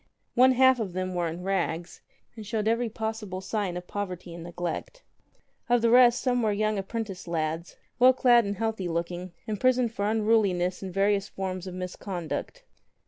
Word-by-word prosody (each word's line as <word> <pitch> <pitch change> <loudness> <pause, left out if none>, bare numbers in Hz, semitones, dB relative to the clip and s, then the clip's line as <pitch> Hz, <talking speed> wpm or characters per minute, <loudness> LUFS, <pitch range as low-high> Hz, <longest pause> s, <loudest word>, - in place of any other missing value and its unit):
One 255 +1 +6
half 260 0 +5
of 200 -5 -3
them 185 0 -2
were 175 -1 0
in 170 +2 -6
rags 175 -3 -2 0.3
and 220 - -8
showed 215 +1 -2
every 230 +1 +1
possible 220 -4 -4
sign 190 -2 -2
of 180 - -7
poverty 180 -3 -5
and 170 -1 -8
neglect. 175 - -5 0.7
Of 240 -1 +3
the 230 - +4
rest, 245 0 +6
some 245 -1 +2
were 215 -2 +2
young 215 0 0
apprentice 195 -2 -5
lads, 165 0 -2 0.2
well 255 +1 +8
clad 245 -2 +5
and 200 -1 -3
healthy 220 -4 -2
looking, 175 +2 -3
imprisoned 245 +2 +1
for 205 0 -1
unruliness 210 -5 +2
and 190 -1 -5
various 200 +1 +1
forms 190 -1 -4
of 185 - -6
misconduct. 185 - -5
200 Hz, 170 wpm, -27 LUFS, 180-225 Hz, 0.7 s, well